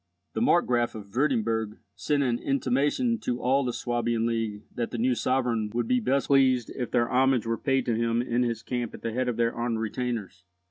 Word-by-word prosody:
The - - -2
Markgraf 125 - +2
of 100 -1 -10
Wurtemburg 115 -5 0 0.2
sent 140 +7 0
an 120 -2 0
intimation 145 - +1
to 125 0 -2
all 135 +3 +2
the 125 - -1
Swabian 120 -1 -1
League 115 -3 -2
that 120 - -2
the 120 - -5
new 125 +3 +2
sovereign 120 -2 0
would 120 - 0
be 250 0 +3
best 140 - +1
pleased 130 -3 +3
if 125 -2 -4
their 120 - +2
homage 130 -1 +2
were 115 0 0
paid 135 +1 0
to 120 - +1
him 115 0 +1
in 120 0 0
his 115 -2 -1
camp 120 -1 -3
at - - -13
the 115 -1 -2
head 125 +1 0
of 120 - -3
their 115 0 +1
armed 120 -1 -2
retainers. 110 -4 -4
120 Hz, 205 wpm, -27 LUFS, 115-130 Hz, 0.2 s, be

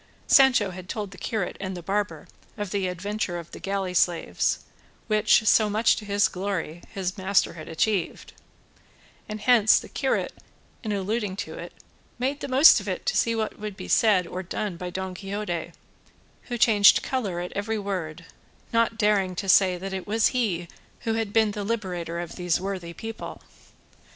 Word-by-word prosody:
Sancho 250 -8 +5
had 180 0 -10
told 205 -3 -4
the 185 - -12
curate 210 -3 -3
and 190 -1 -4
the 175 - -8
barber 195 -5 -2 0.3
of 205 -3 -4
the 195 -2 0
adventure 185 +1 -3
of 170 -1 -9
the - - -9
galley 195 -2 -2
slaves, 175 -1 +1 0.4
which, 215 0 +3
so 215 0 +5
much 215 +2 +3
to 215 - -7
his 205 0 +3
glory, 180 -3 -4
his 190 0 -4
master 190 +1 +2
had 155 -2 -9
achieved, 175 +2 -1 1.0
and 215 0 -5
hence 225 -3 +5
the - - -10
curate 270 -2 -1 0.5
in 215 - -3
alluding 205 0 -2
to - - -5
it - - -8 0.5
made 270 +4 -1
the - - -5
most 270 +4 +7
of - - -9
it - - -4
to - - 0
see 230 0 +2
what 220 -1 -3
would 210 -2 -6
be - - -7
said 205 -5 +4
or 180 +2 -5
done 190 +1 -4
by 180 +1 -5
Don 190 +1 -4
Quixote; 195 -3 -4 0.7
who 240 - -4
changed 210 -3 +6
colour 205 -10 -2
at 175 0 -5
every 210 +3 -2
word, 180 -5 -4 0.5
not 230 -1 +2
daring 205 -4 +2
to 195 +3 -4
say 185 -1 +5
that 190 +2 -6
it 190 0 -5
was 220 +1 +3
he 200 -9 -1 0.3
who 225 -2 -1
had 225 -2 -2
been 220 -1 +3
the 205 0 -4
liberator 180 -6 -3
of 175 -1 -6
those 180 -2 0
worthy 185 -3 -4
people. 225 +6 -7
200 Hz, 180 wpm, -25 LUFS, 180-215 Hz, 1.0 s, most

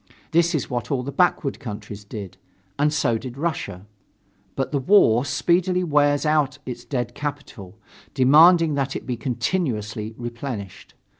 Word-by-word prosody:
That 170 +1 +3
is 150 - -1
what 120 -3 -4
all 135 -4 -1
the 140 - -5
backward 165 -4 +1
countries 105 -2 -8
did, 100 -2 -8 0.4
and 150 +1 +3
so 120 -6 +1
did 125 +1 -8
Russia. 120 - -3 0.7
But 135 - -2
the 145 - 0
war 130 - +4
speedily 180 +4 +1
wears 145 -2 +2
out 150 -2 +1
its 120 -1 -6
dead 120 -3 -3
capital, 140 -9 -7 0.4
demanding 155 +5 +6
that 135 -1 -1
it - - -5
be 125 - -2
continuously 115 - -2
replenished. 120 -4 -7
135 Hz, 145 wpm, -23 LUFS, 115-150 Hz, 0.7 s, demanding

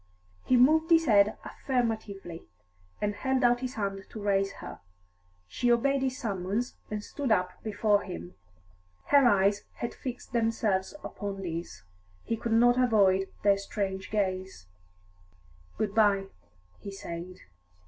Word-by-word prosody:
He 255 - +3
moved 315 +6 +5
his 325 -1 +5
head 210 -4 +4
affirmatively, 220 -9 -3 0.5
and 210 0 -1
held 265 +4 0
out 240 0 +4
his 255 0 -5
hand 195 -2 -3
to 220 - -8
raise 195 -1 +1
her. - - -9 0.7
She 240 - 0
obeyed 275 +3 +2
his 260 -1 -1
summons, 205 +2 -2
and 210 -1 -4
stood 275 0 -3
up 180 -4 0
before 210 -1 +2
him; 85 +2 -8 0.8
her 280 -3 +6
eyes 200 -1 +3
had 235 - -4
fixed 255 0 -7
themselves 225 -2 0
upon 200 -2 -5
his; 170 - -6 0.4
he 230 - -1
could 230 0 -2
not 245 +2 +5
avoid 195 -5 +3
their 200 -1 +5
strange 195 -1 -4
gaze. 190 - -2 1.1
"Good 210 -1 -1
bye," 200 -3 +3 0.5
he 200 - -7
said. 180 -1 -7
210 Hz, 135 wpm, -29 LUFS, 195-240 Hz, 1.1 s, her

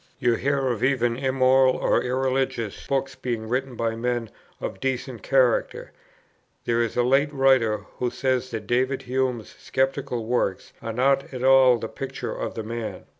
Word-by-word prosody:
You 120 - +2
hear 140 +2 0
of 120 -3 -2
even 125 -3 +2
immoral 130 0 +3
or - - +2
irreligious 130 -3 -2
books 135 -1 -1
being 115 -4 -4
written 130 +2 -2
by 115 -1 -1
men 120 -1 -2 0.3
of 95 - -5
decent 130 -1 -3
character; 130 -3 +1 0.7
there 115 0 +1
is 115 0 -2
a 120 - +4
late 135 +4 +3
writer 130 -7 +2
who 125 - 0
says 130 0 -1
that 110 -3 -5
David 130 +4 0
Hume's 125 -3 -2
sceptical 135 -3 -1
works 110 -5 -1
are 115 0 -4
not 135 +4 +1
at 130 -2 -5
all 130 -2 +6
the 115 - -5
picture 135 +3 -5
of - - -5
the 110 - -4
man. 115 0 -5
125 Hz, 165 wpm, -24 LUFS, 115-135 Hz, 0.7 s, all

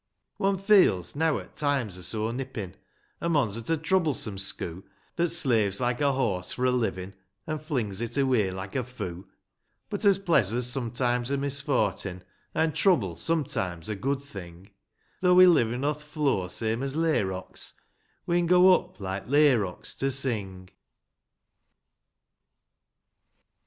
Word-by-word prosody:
vi. 200 - -1
One 195 0 +2
feels, 185 - +3
neaw 160 +1 +1
'at - - -13
times 140 -10 -1
are 90 - -7
so 110 +5 -2
nippin', 120 -7 -5 0.5
A 170 - -1
mon's 140 -11 +1
at 115 +4 -7
a 165 - +2
troublesome 155 - 0
schoo', 95 -2 -3 0.3
That 175 0 +1
slaves 115 - +2
like 120 0 -1
a 140 -1 +3
horse 100 -9 -1
for 125 - -2
a 130 - +3
hvin', 100 -6 -2 0.3
An' 155 -1 -3
flings 120 - -3
it 120 +2 -4
away 130 -7 +2
hke 95 +1 -7
a 130 - 0
foo; 100 -7 -7 0.6
But, 205 +1 -3
as 200 -2 +5
pleasur's 125 - +1
sometimes 125 0 0
a 140 - 0
misfortin' 140 -9 0 0.3
An' 160 -1 +1
trouble 150 - +2
sometimes 95 - -2
a 105 - -2
good 135 +6 -2
thing, 95 -6 -11 0.2
— - - -40
Though 180 -1 +4
we 185 0 +9
livin' 125 -7 +3
o'th 150 0 -1
floor 145 - -1
same 110 +4 -2
as 135 0 -3
layrocks, 100 - -2 0.5
We'n 175 0 +1
go 180 +1 +7
up, - - -2
like 95 0 -5
layrocks, 130 -9 +2
to 135 - +1
sing 105 -9 -2
125 Hz, 145 wpm, -27 LUFS, 100-150 Hz, 0.6 s, we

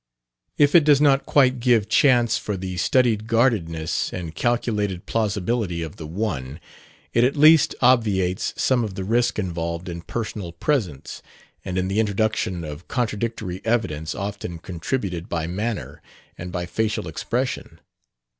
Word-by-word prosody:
If 145 -1 +4
it 170 - +7
does 145 -2 +5
not 140 -2 +3
quite 130 -3 +4
give 115 -4 +3
chance 120 -4 +4
for 105 -2 -3
the 95 0 -5
studied 110 +1 +2
guardedness 105 -10 +1
and 85 -3 -5
calculated 105 -5 -1
plausibility 105 -4 -1
of 80 - -8
the 80 - -7
one, 80 -7 -3 0.5
it 115 - +4
at 130 +3 +2
least 155 +1 +6
obviates 105 -7 +2
some 125 -2 +2
of 105 -4 -5
the 95 - -4
risk 120 +4 +1
involved 85 -3 -3
in 85 -1 -5
personal 105 -4 -5
presence 90 - -2 0.4
and 95 -1 -4
in 95 0 0
the 100 +3 0
introduction 105 -4 0
of 75 +2 -8
contradictory 110 -5 -3
evidence 95 -10 -1
often 100 -3 -5
contributed 90 +1 -4
by 80 -2 -2
manner 105 +6 -4 0.3
and 90 +1 -7
by 90 -1 -3
facial 105 0 -2
expression. 125 +10 -3
105 Hz, 145 wpm, -23 LUFS, 90-120 Hz, 0.5 s, it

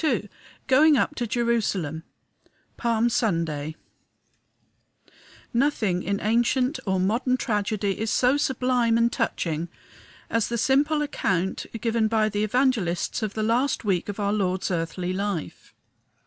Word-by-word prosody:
XXII 235 -9 0 0.4
GOING 295 +3 +5
UP 295 - +1
TO 240 -5 -3
JERUSALEM 210 -10 -1 0.7
Palm 235 -1 +1
Sunday 165 -9 -1 1.8
Nothing 230 -8 +1
in 200 +3 -2
ancient 240 +5 +1
or 190 -1 +1
modern 235 +7 +1
tragedy 210 -4 -1
is 220 0 -1
so 250 +4 +3
sublime 250 -4 +1
and 235 0 +3
touching 170 - -2 0.6
as 230 -2 0
the 235 - -2
simple 285 +5 +2
account 190 - -1
given 230 0 +1
by 215 -1 +2
the 210 0 -1
Evangelists 220 -6 0
of 215 -2 -3
the 215 - -1
last 245 +3 +1
week 190 -2 0
of 205 - -5
our 200 0 0
Lord's 190 -2 -1
earthly 175 +1 -2
life. 195 -4 -4
220 Hz, 130 wpm, -25 LUFS, 190-245 Hz, 1.8 s, GOING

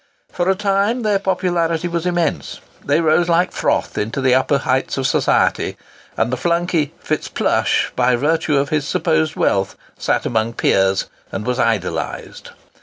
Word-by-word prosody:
For 175 +1 -1
a 190 - +3
time 205 +4 0
their 205 -2 +2
popularity 175 -3 0
was 170 0 -2
immense. 175 -2 -1 0.2
They - - +2
rose 165 +2 +2
like 175 +2 +2
froth - - -1
into 110 +6 -2
the 130 -1 +3
upper 130 +2 +2
heights 130 0 -1
of 135 - -1
society, - - +1 0.4
and 120 +3 0
the - - 0
flunkey 170 0 0
FitzPlushe, - - 0
by 125 0 +3
virtue 150 +3 +1
of 140 +1 0
his 150 -2 -1
supposed 160 0 0
wealth, 95 -1 0 0.2
sat - - 0
amongst 115 0 -1
peers 95 0 +2 0.3
and 105 - -4
was 125 0 -1
idolised. 115 -4 -2
155 Hz, 155 wpm, -19 LUFS, 125-175 Hz, 0.4 s, a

